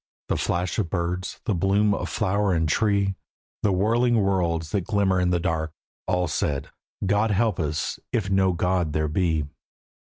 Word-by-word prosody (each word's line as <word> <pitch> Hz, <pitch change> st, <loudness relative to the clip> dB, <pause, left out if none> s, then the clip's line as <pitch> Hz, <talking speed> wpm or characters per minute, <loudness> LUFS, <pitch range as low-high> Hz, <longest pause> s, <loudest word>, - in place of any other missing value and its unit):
The -, -, +2 dB
flash 90 Hz, +1 st, -1 dB
of 95 Hz, -6 st, -1 dB
birds, 90 Hz, +1 st, -2 dB
the 110 Hz, -, +1 dB
bloom 100 Hz, +3 st, +2 dB
of -, -, -3 dB
flower 100 Hz, -2 st, +1 dB
and 80 Hz, -1 st, +1 dB
tree, 100 Hz, +3 st, +2 dB, 0.5 s
The 105 Hz, -, +2 dB
whirling 115 Hz, +5 st, +2 dB
worlds 85 Hz, -5 st, 0 dB
that 100 Hz, -, +1 dB
glimmer 95 Hz, 0 st, +1 dB
in 90 Hz, -1 st, +2 dB
the 90 Hz, -1 st, +2 dB
dark, 80 Hz, -2 st, -1 dB, 0.3 s
All 90 Hz, -1 st, +1 dB
said: 70 Hz, -2 st, -2 dB, 0.3 s
"God 105 Hz, +3 st, +2 dB
help 110 Hz, +1 st, +1 dB
us 75 Hz, -1 st, -2 dB
if 110 Hz, -5 st, 0 dB
no 95 Hz, -1 st, +3 dB
God 90 Hz, -2 st, 0 dB
there 75 Hz, 0 st, +1 dB
be." 80 Hz, -1 st, 0 dB
95 Hz, 165 wpm, -25 LUFS, 85-100 Hz, 0.5 s, no